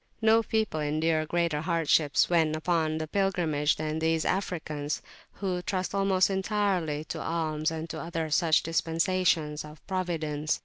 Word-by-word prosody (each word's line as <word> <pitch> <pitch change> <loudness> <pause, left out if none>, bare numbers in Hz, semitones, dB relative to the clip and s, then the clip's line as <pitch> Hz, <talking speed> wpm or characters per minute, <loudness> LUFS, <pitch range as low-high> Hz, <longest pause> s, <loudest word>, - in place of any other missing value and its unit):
No 225 0 +5
people 220 -7 -1
endure 155 +1 0
greater 170 -3 0
hardships 160 -3 +2
when 160 -3 +2
upon 160 -1 0
the 160 - -2
pilgrimage 165 -6 +1
than 155 0 -3
these 160 0 +1
Africans, 155 -6 -2 0.3
who 185 -3 -2
trust 185 0 -2
almost 195 -1 +2
entirely 190 -6 0
to - - -6
alms 155 -1 -1
and 160 0 -5
to - - -5
other 165 -2 -3
such 160 0 +3
dispensations 165 -2 +1
of 150 -1 -13
Providence. 160 -5 -2
165 Hz, 140 wpm, -28 LUFS, 155-185 Hz, 0.3 s, No